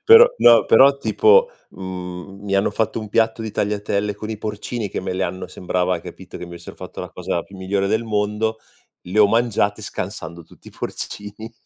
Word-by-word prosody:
però 455 Hz, +2 st, +10 dB
no, 115 Hz, -1 st, +7 dB
però 135 Hz, +4 st, +6 dB
tipo, 460 Hz, -, +4 dB, 0.2 s
mhmm, 95 Hz, +1 st, -8 dB
mi 100 Hz, -1 st, -1 dB
hanno 100 Hz, -, +2 dB
fatto 110 Hz, +2 st, -1 dB
un 110 Hz, -, -7 dB
piatto 110 Hz, 0 st, +1 dB
di 110 Hz, -, -4 dB
tagliatelle 105 Hz, 0 st, -1 dB
con 105 Hz, +2 st, -7 dB
i 110 Hz, -, -5 dB
porcini, 105 Hz, +1 st, -4 dB
che -, -, -4 dB
me 95 Hz, -1 st, -3 dB
le 95 Hz, 0 st, -1 dB
hanno 95 Hz, +1 st, -4 dB
sembrava, 90 Hz, 0 st, -1 dB
hai 85 Hz, -, -4 dB
capito, -, -, -10 dB
che -, -, -6 dB
mi 85 Hz, -, -12 dB
avessero 85 Hz, 0 st, -10 dB
fatto -, -, -8 dB
la -, -, -7 dB
cosa 85 Hz, -, -3 dB
più 100 Hz, -, -16 dB
migliore 95 Hz, +1 st, -1 dB
del 110 Hz, +3 st, 0 dB
mondo, 105 Hz, +1 st, -1 dB, 0.4 s
le 95 Hz, +4 st, -3 dB
ho 105 Hz, -1 st, +7 dB
mangiate, 110 Hz, -2 st, +1 dB
scansando 90 Hz, -4 st, -6 dB
tutti -, -, -17 dB
i -, -, -13 dB
porcini. 105 Hz, +3 st, -6 dB
105 Hz, 200 wpm, -21 LUFS, 95-110 Hz, 0.4 s, però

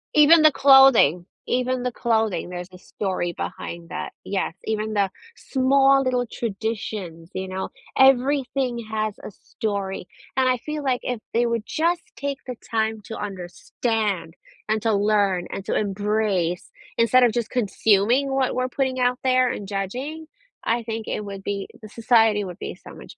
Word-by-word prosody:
Even 310 Hz, +2 st, +7 dB
the 310 Hz, -, +8 dB
clothing, 270 Hz, -, +6 dB, 0.2 s
even 255 Hz, 0 st, 0 dB
the 250 Hz, -, -1 dB
clothing, 220 Hz, -7 st, 0 dB
there's 180 Hz, 0 st, -6 dB
a 180 Hz, -, -12 dB
story 185 Hz, -2 st, -3 dB
behind 170 Hz, +1 st, -6 dB
that, 180 Hz, -, -5 dB
yes, 195 Hz, -4 st, -2 dB
even 220 Hz, 0 st, -2 dB
the 200 Hz, -2 st, +2 dB, 0.3 s
small 270 Hz, +1 st, +3 dB
little 250 Hz, -1 st, 0 dB
traditions, 200 Hz, -6 st, -4 dB
you 190 Hz, 0 st, -4 dB
know, 185 Hz, 0 st, -4 dB, 0.3 s
everything 265 Hz, -2 st, +3 dB
has 215 Hz, -1 st, -1 dB
a -, -, -7 dB
story, 195 Hz, -3 st, -4 dB, 0.3 s
and 260 Hz, -, +3 dB
I 255 Hz, 0 st, +3 dB
feel 300 Hz, +4 st, -5 dB
like 255 Hz, -3 st, +1 dB
if 245 Hz, -2 st, -3 dB
they 235 Hz, +1 st, +2 dB
would 230 Hz, -2 st, -1 dB
just 335 Hz, +2 st, 0 dB
take 280 Hz, -1 st, -3 dB
the 250 Hz, -, -5 dB
time 220 Hz, -1 st, 0 dB
to 225 Hz, -, -7 dB
understand 195 Hz, -1 st, -3 dB, 0.3 s
and 215 Hz, 0 st, +2 dB
to 225 Hz, -1 st, +2 dB
learn 200 Hz, -3 st, +2 dB
and 195 Hz, -, -6 dB
to -, -, -1 dB
embrace 205 Hz, -3 st, -1 dB, 0.3 s
instead 235 Hz, +2 st, +5 dB
of 240 Hz, -, +5 dB
just 235 Hz, -3 st, -2 dB
consuming 225 Hz, +4 st, +2 dB
what 270 Hz, -1 st, +1 dB
we're 255 Hz, 0 st, -1 dB
putting 260 Hz, 0 st, -1 dB
out 250 Hz, 0 st, +2 dB
there 255 Hz, -1 st, +3 dB
and 200 Hz, -, -6 dB
judging, 250 Hz, +11 st, -4 dB, 0.4 s
I 230 Hz, +1 st, 0 dB
think 225 Hz, -1 st, -5 dB
it 210 Hz, -, -3 dB
would 195 Hz, -1 st, -7 dB
be 200 Hz, 0 st, -3 dB
the 215 Hz, -, -10 dB
society 225 Hz, -2 st, +3 dB
would 185 Hz, -1 st, -8 dB
be -, -, -5 dB
so -, -, -13 dB
much -, -, -13 dB
220 Hz, 165 wpm, -23 LUFS, 195-255 Hz, 0.4 s, the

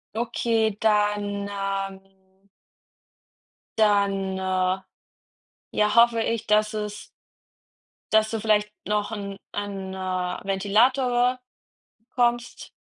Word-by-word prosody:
Okay, 225 Hz, -2 st, 0 dB
dann, 205 Hz, -1 st, +1 dB
ähm 195 Hz, -1 st, -6 dB, 1.3 s
Dann, 200 Hz, -2 st, +2 dB
äh, 185 Hz, 0 st, 0 dB, 1.0 s
ja, 210 Hz, 0 st, +3 dB
hoffe 235 Hz, 0 st, +5 dB
ich, 230 Hz, 0 st, -2 dB
dass 215 Hz, +1 st, +3 dB
es 210 Hz, -1 st, -5 dB, 1.1 s
dass 220 Hz, 0 st, +4 dB
du 225 Hz, -, -2 dB
vielleicht 210 Hz, -1 st, +2 dB, 0.2 s
noch 210 Hz, 0 st, 0 dB
'n 200 Hz, -2 st, -5 dB
ein, 195 Hz, -2 st, -5 dB
äh, 185 Hz, 0 st, -3 dB
Ventilator 245 Hz, +6 st, +2 dB, 0.6 s
bekommst. 240 Hz, +1 st, -1 dB
210 Hz, 90 wpm, -25 LUFS, 195-220 Hz, 1.3 s, hoffe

